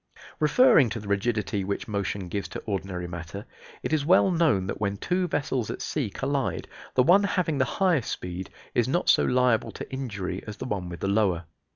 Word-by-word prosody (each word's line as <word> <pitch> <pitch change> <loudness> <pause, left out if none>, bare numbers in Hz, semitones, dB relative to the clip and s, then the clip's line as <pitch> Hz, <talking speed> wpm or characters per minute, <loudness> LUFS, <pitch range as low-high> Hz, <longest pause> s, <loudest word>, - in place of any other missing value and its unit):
Referring 155 - +5
to 115 - -4
the 105 - -9
rigidity 105 0 0
which 100 +1 -3
motion 100 -2 -2
gives 100 +3 -3
to - - -7
ordinary 95 -3 -3
matter, 85 +4 -7 0.4
it - - -2
is 155 -2 +2
well 185 +4 +5
known 160 - +2
that 100 - -5
when 100 -1 0
two 180 - 0
vessels 135 -7 -1
at - - -4
sea 140 -8 -2
collide 135 +5 -2 0.3
the 125 - +5
one 190 +8 +6
having 180 -7 0
the 130 - +4
higher 180 -7 +3
speed 90 -3 -5 0.2
is - - +2
not - - +1
so - - +5
liable 125 - +2
to - - -9
injury 105 -8 -4
as 105 - -6
the - - -5
one 100 -7 -3
with 85 -2 -8
the - - 0
lower. 100 -4 +1
110 Hz, 200 wpm, -26 LUFS, 95-145 Hz, 0.4 s, one